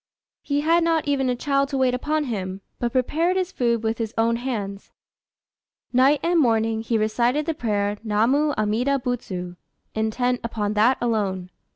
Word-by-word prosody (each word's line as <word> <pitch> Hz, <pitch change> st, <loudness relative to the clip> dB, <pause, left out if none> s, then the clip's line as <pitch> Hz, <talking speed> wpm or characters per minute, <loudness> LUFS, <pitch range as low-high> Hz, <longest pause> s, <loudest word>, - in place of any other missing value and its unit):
He 285 Hz, 0 st, -1 dB
had 330 Hz, +3 st, +3 dB
not 330 Hz, -2 st, +1 dB
even 270 Hz, -2 st, +1 dB
a 250 Hz, -, +1 dB
child 275 Hz, +2 st, 0 dB
to 275 Hz, -, -2 dB
wait 260 Hz, -1 st, +2 dB
upon 300 Hz, +5 st, 0 dB
him, 195 Hz, -7 st, -4 dB, 0.2 s
but 240 Hz, -1 st, -1 dB
prepared 320 Hz, +9 st, +1 dB
his 370 Hz, 0 st, -1 dB
food 235 Hz, -, 0 dB
with 225 Hz, +1 st, -1 dB
his 225 Hz, -1 st, -3 dB
own 230 Hz, +1 st, +2 dB
hands. 210 Hz, -6 st, -4 dB, 1.0 s
Night 270 Hz, +4 st, +4 dB
and 340 Hz, 0 st, +3 dB
morning 225 Hz, -4 st, +2 dB
he 230 Hz, 0 st, 0 dB
recited 235 Hz, +7 st, +1 dB
the 325 Hz, -, -1 dB
prayer 205 Hz, -6 st, -1 dB
"Namu 245 Hz, +8 st, +2 dB
Amida 225 Hz, +6 st, +1 dB
Butsu," 185 Hz, -9 st, -4 dB, 0.4 s
intent 245 Hz, +3 st, 0 dB
upon 215 Hz, -3 st, -2 dB
that 225 Hz, +5 st, +3 dB
alone. 195 Hz, -6 st, -1 dB
240 Hz, 165 wpm, -23 LUFS, 215-280 Hz, 1.0 s, Night